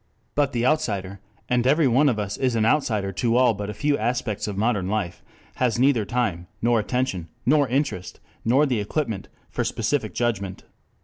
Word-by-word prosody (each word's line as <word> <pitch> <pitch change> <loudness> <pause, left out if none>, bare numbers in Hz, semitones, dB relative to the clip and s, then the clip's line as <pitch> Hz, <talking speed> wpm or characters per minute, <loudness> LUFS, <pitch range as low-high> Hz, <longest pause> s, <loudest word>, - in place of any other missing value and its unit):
But 145 -1 +1
the 120 -2 0
outsider, 100 -10 0 0.3
and 125 0 +2
every 150 +2 +4
one 135 +4 +4
of 120 - 0
us 105 -1 -2
is 130 -3 0
an 110 -1 +2
outsider 110 -7 +1
to 115 +5 +1
all 125 -2 +5
but 100 0 -5
a - - -4
few 145 +5 +1
aspects 115 -2 -1
of 100 -2 -4
modern 105 -3 +1
life, 95 -4 -2 0.4
has 120 -3 +1
neither 125 -4 +3
time, 100 -8 -1
nor 120 0 +3
attention, 110 -7 -1 0.2
nor 145 +1 +4
interest, 125 -9 -2 0.2
nor 130 +6 +4
the 125 -6 0
equipment 110 -1 -2 0.2
for - - -1
specific - - -1
judgment. 100 -5 -2
115 Hz, 180 wpm, -24 LUFS, 100-130 Hz, 0.4 s, all